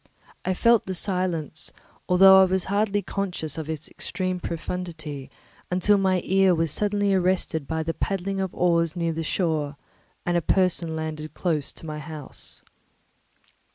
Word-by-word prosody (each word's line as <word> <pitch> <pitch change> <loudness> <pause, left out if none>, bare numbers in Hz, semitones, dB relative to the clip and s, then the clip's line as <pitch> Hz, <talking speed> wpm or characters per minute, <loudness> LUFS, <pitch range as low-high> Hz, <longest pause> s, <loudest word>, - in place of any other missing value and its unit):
I 185 - 0
felt 230 +1 +4
the 190 - -2
silence, 175 -5 -2 0.4
although 190 +1 +8
I - - +7
was 190 0 0
hardly 205 0 0
conscious 175 -6 -3
of 160 -1 -6
its 155 -1 -4
extreme 185 -1 -3
profundity, 165 -5 -5 0.4
until 190 +3 +3
my 190 -2 +2
ear 190 -1 +4
was 165 -2 0
suddenly 205 +2 +1
arrested 180 -5 +1
by 160 0 -1
the 165 +1 -2
paddling 195 +1 -2
of 190 -2 -2
oars 170 -2 +2
near 170 -2 0
the 165 - -3
shore, 155 -5 -1 0.5
and 175 - +1
a 175 - +3
person 175 -2 +2
landed 155 -1 -5
close 155 -6 -1
to - - -9
my 155 -1 -5
house. 150 -2 -5
175 Hz, 155 wpm, -25 LUFS, 160-190 Hz, 0.5 s, although